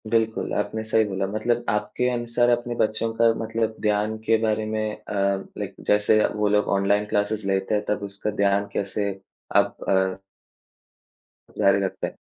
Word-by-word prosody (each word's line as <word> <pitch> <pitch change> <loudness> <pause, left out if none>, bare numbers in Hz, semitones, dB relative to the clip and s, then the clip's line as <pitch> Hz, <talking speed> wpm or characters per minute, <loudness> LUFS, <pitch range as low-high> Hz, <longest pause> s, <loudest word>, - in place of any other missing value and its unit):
बिल्कुल, 110 0 0
आपने 105 +2 -2
सही 110 0 +2
बोला। 95 -1 -2
मतलब 120 +4 -1
आपके 115 +4 0
अनुसार 120 0 +1
अपने 120 0 0
बच्चों 115 0 0
का 115 0 +4
मतलब 110 0 -1
ध्यान 105 +1 +1
के 115 0 +4
बारे 110 -1 +1
में 110 0 -2
अ, 105 - -8
लाइक 100 0 -2
जैसे 105 +1 +4 0.2
वो 105 0 +1
लोग 105 0 +2
ऑनलाइन 100 +2 +2
क्लासेज़ 105 0 0
लेते 95 +2 +1
हैं 105 - 0
तब 105 0 -1
उसका 100 +1 -4
ध्यान 100 0 +2
कैसे 100 +1 -1 0.5
आप - - +3
अ 95 0 +1 1.4
जारी 100 -1 +4
रखते? 95 - -4
105 Hz, 155 wpm, -24 LUFS, 100-110 Hz, 1.4 s, का